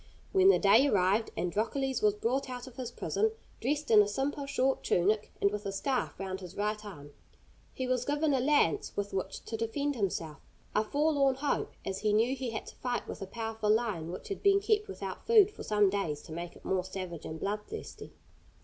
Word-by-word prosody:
When 380 Hz, 0 st, +6 dB
the -, -, +7 dB
day 220 Hz, +7 st, +5 dB
arrived 200 Hz, 0 st, +2 dB
Androcles 230 Hz, +9 st, -1 dB
was 210 Hz, -1 st, +3 dB
brought 255 Hz, +5 st, -1 dB
out 245 Hz, -1 st, -6 dB
of 260 Hz, -3 st, -12 dB
his 255 Hz, -3 st, -4 dB
prison, 440 Hz, -, 0 dB, 0.3 s
dressed 290 Hz, +2 st, -1 dB
in 215 Hz, -1 st, +9 dB
a 205 Hz, -, +2 dB
simple, 275 Hz, +6 st, -2 dB
short 270 Hz, -1 st, +1 dB
tunic, 205 Hz, +4 st, +1 dB
and 200 Hz, -, +3 dB
with 210 Hz, 0 st, -4 dB
a -, -, -2 dB
scarf 255 Hz, +6 st, -2 dB
round 190 Hz, -1 st, -4 dB
his 180 Hz, 0 st, -10 dB
right 210 Hz, +1 st, -1 dB
arm. 145 Hz, -9 st, -10 dB, 0.6 s
He 260 Hz, -, -4 dB
was 255 Hz, -1 st, 0 dB
given 290 Hz, +2 st, +1 dB
a 265 Hz, -, +3 dB
lance 270 Hz, -, +2 dB
with 200 Hz, 0 st, -2 dB
which 190 Hz, -, -4 dB
to 225 Hz, -, -4 dB
defend 280 Hz, +6 st, -1 dB
himself 170 Hz, -, -2 dB, 0.3 s
a 215 Hz, -, +3 dB
forlorn 280 Hz, +1 st, +2 dB
hope, 280 Hz, +2 st, -1 dB
as 190 Hz, 0 st, -3 dB
he 210 Hz, -1 st, +1 dB
knew 225 Hz, +3 st, +4 dB
that 270 Hz, -, -3 dB
he 255 Hz, -2 st, -2 dB
had 225 Hz, -, -4 dB
to -, -, -11 dB
fight 245 Hz, -1 st, -2 dB
with -, -, -7 dB
a 195 Hz, -, -4 dB
powerful 225 Hz, 0 st, -3 dB
lion 210 Hz, -7 st, +1 dB
which 180 Hz, -, -8 dB
had 395 Hz, -, -4 dB
been 395 Hz, -1 st, +5 dB
kept 425 Hz, 0 st, +1 dB
without -, -, -7 dB
food 425 Hz, -3 st, +6 dB
for -, -, -11 dB
some 210 Hz, -1 st, +3 dB
days 160 Hz, -7 st, -2 dB
to -, -, -12 dB
make 170 Hz, +2 st, -6 dB
it -, -, -17 dB
more 190 Hz, -1 st, +1 dB
savage 185 Hz, -3 st, -6 dB
and 160 Hz, 0 st, -6 dB
bloodthirsty. 210 Hz, -, -5 dB
225 Hz, 210 wpm, -31 LUFS, 195-275 Hz, 0.6 s, in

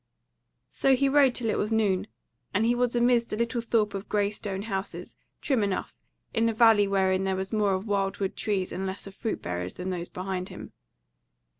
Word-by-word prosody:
So 270 Hz, -1 st, +3 dB
he 275 Hz, +2 st, +2 dB
rode 275 Hz, -2 st, +4 dB
till 230 Hz, -3 st, 0 dB
it -, -, -1 dB
was 210 Hz, -, -1 dB
noon, 205 Hz, -4 st, +1 dB, 0.5 s
and 210 Hz, +3 st, +3 dB
he 235 Hz, -, +3 dB
was 245 Hz, 0 st, 0 dB
amidst 240 Hz, -1 st, +3 dB
a -, -, +1 dB
little 235 Hz, +2 st, -1 dB
thorp 225 Hz, -3 st, +1 dB
of 195 Hz, +1 st, -6 dB
grey 205 Hz, -1 st, +1 dB
stone 200 Hz, -2 st, -4 dB
houses, 195 Hz, -3 st, -4 dB, 0.3 s
trim 265 Hz, -6 st, +1 dB
enough, 200 Hz, -2 st, -2 dB, 0.3 s
in 230 Hz, +1 st, +2 dB
a -, -, -1 dB
valley 220 Hz, -3 st, +6 dB
wherein 190 Hz, -1 st, +2 dB
there 190 Hz, 0 st, 0 dB
was 190 Hz, +3 st, -4 dB
more 205 Hz, -3 st, +2 dB
of 190 Hz, +2 st, -4 dB
wild 200 Hz, -2 st, 0 dB
wood 195 Hz, -2 st, -2 dB
trees 195 Hz, -3 st, -1 dB
and 190 Hz, +1 st, -3 dB
less 190 Hz, +1 st, -5 dB
of 195 Hz, -, -9 dB
fruit 220 Hz, +3 st, -4 dB
bearers 90 Hz, +1 st, -4 dB
than 185 Hz, +1 st, -4 dB
those 175 Hz, -1 st, -4 dB
behind 185 Hz, 0 st, -4 dB
him. -, -, -10 dB
205 Hz, 205 wpm, -27 LUFS, 190-230 Hz, 0.5 s, valley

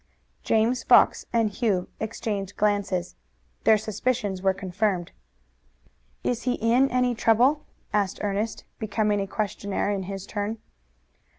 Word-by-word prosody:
James 230 Hz, +3 st, +2 dB
Fox -, -, +4 dB
and 225 Hz, -2 st, +2 dB
Hugh 200 Hz, -5 st, 0 dB
exchanged 210 Hz, -3 st, -4 dB
glances. 200 Hz, -4 st, 0 dB, 0.5 s
Their 220 Hz, -, +6 dB
suspicions 210 Hz, -2 st, -2 dB
were 190 Hz, 0 st, +3 dB
confirmed. 190 Hz, -1 st, -2 dB, 1.1 s
"Is 240 Hz, -1 st, -1 dB
he 250 Hz, -, 0 dB
in 240 Hz, +4 st, +3 dB
any 250 Hz, 0 st, +2 dB
trouble?" 240 Hz, +6 st, +3 dB, 0.3 s
asked 200 Hz, -2 st, +1 dB
Ernest, 210 Hz, +2 st, -2 dB, 0.2 s
becoming 210 Hz, -1 st, 0 dB
a 195 Hz, -, -3 dB
questioner 205 Hz, 0 st, -2 dB
in 200 Hz, -1 st, -1 dB
his 195 Hz, -1 st, -5 dB
turn. 210 Hz, +2 st, -3 dB
210 Hz, 120 wpm, -26 LUFS, 195-230 Hz, 1.1 s, Their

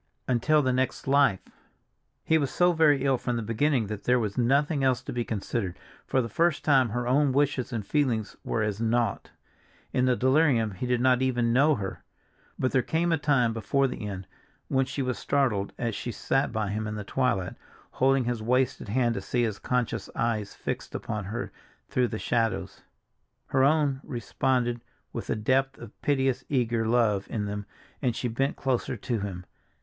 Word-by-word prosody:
Until 145 Hz, +5 st, +3 dB
the 130 Hz, -1 st, +1 dB
next 130 Hz, +1 st, -1 dB
life! 135 Hz, -8 st, +4 dB, 0.8 s
He 160 Hz, 0 st, +3 dB
was 140 Hz, -3 st, 0 dB
so 180 Hz, 0 st, +3 dB
very 150 Hz, -4 st, +4 dB
ill 135 Hz, -2 st, +2 dB
from 125 Hz, -, -2 dB
the 115 Hz, -, -2 dB
beginning 115 Hz, +3 st, +1 dB
that 105 Hz, 0 st, -6 dB
there 125 Hz, 0 st, +4 dB
was 105 Hz, -4 st, -2 dB
nothing 140 Hz, +4 st, +2 dB
else 130 Hz, -1 st, +2 dB
to -, -, -6 dB
be 120 Hz, -1 st, -1 dB
considered; 105 Hz, -3 st, -3 dB, 0.3 s
for 130 Hz, -, +2 dB
the -, -, -3 dB
first 170 Hz, +5 st, +1 dB
time 135 Hz, -5 st, +4 dB
her 120 Hz, +3 st, -2 dB
own 140 Hz, +2 st, +3 dB
wishes 140 Hz, -2 st, +1 dB
and 110 Hz, -4 st, -3 dB
feelings 120 Hz, -7 st, 0 dB
were 110 Hz, -, -1 dB
as 105 Hz, 0 st, -2 dB
naught. 115 Hz, +1 st, 0 dB, 0.6 s
In 125 Hz, -, +2 dB
the 125 Hz, -1 st, +3 dB
delirium 130 Hz, -4 st, +3 dB
he 95 Hz, +6 st, -4 dB
did 125 Hz, -1 st, +1 dB
not 130 Hz, 0 st, +4 dB
even 120 Hz, -3 st, +1 dB
know 145 Hz, +4 st, +4 dB
her. 100 Hz, -5 st, -5 dB, 0.5 s
But 130 Hz, -, 0 dB
there 130 Hz, -, +3 dB
came 170 Hz, +6 st, 0 dB
a 165 Hz, -, +3 dB
time 130 Hz, -6 st, +2 dB
before 125 Hz, +5 st, +1 dB
the 110 Hz, -4 st, -5 dB
end 95 Hz, -2 st, -6 dB, 0.4 s
when 135 Hz, -1 st, +2 dB
she 135 Hz, +1 st, -3 dB
was 125 Hz, -5 st, -2 dB
startled 110 Hz, -9 st, 0 dB
as 115 Hz, -2 st, -2 dB
she 120 Hz, +4 st, -4 dB
sat 135 Hz, +5 st, 0 dB
by 110 Hz, -3 st, -2 dB
him 110 Hz, +1 st, -2 dB
in 105 Hz, -, -4 dB
the 105 Hz, -, -4 dB
twilight, 100 Hz, -5 st, 0 dB, 0.4 s
holding 135 Hz, 0 st, +2 dB
his 120 Hz, -2 st, -2 dB
wasted 125 Hz, +2 st, 0 dB
hand 120 Hz, +1 st, +2 dB
to 100 Hz, -, -4 dB
see 120 Hz, +5 st, 0 dB
his 105 Hz, -3 st, -2 dB
conscious 125 Hz, -2 st, -1 dB
eyes 110 Hz, -3 st, -1 dB
fixed -, -, -5 dB
upon 105 Hz, -3 st, -4 dB
her 110 Hz, +5 st, -4 dB, 0.4 s
through 125 Hz, -1 st, +2 dB
the 110 Hz, -, -4 dB
shadows. 115 Hz, 0 st, -1 dB, 0.7 s
Her 130 Hz, -1 st, +3 dB
own 140 Hz, -2 st, +2 dB
responded 120 Hz, +1 st, -1 dB, 0.3 s
with -, -, -5 dB
a -, -, +1 dB
depth 135 Hz, +5 st, +1 dB
of 115 Hz, -2 st, -12 dB
piteous 135 Hz, -2 st, +1 dB
eager 120 Hz, -4 st, +1 dB
love 110 Hz, -4 st, +2 dB
in 105 Hz, -2 st, -2 dB
them 105 Hz, 0 st, -5 dB, 0.3 s
as 125 Hz, -5 st, 0 dB
she 125 Hz, -, -2 dB
bent 135 Hz, +4 st, -1 dB
closer 130 Hz, -2 st, -1 dB
to 115 Hz, +2 st, -2 dB
him. 95 Hz, -3 st, -5 dB
125 Hz, 190 wpm, -27 LUFS, 110-135 Hz, 0.8 s, life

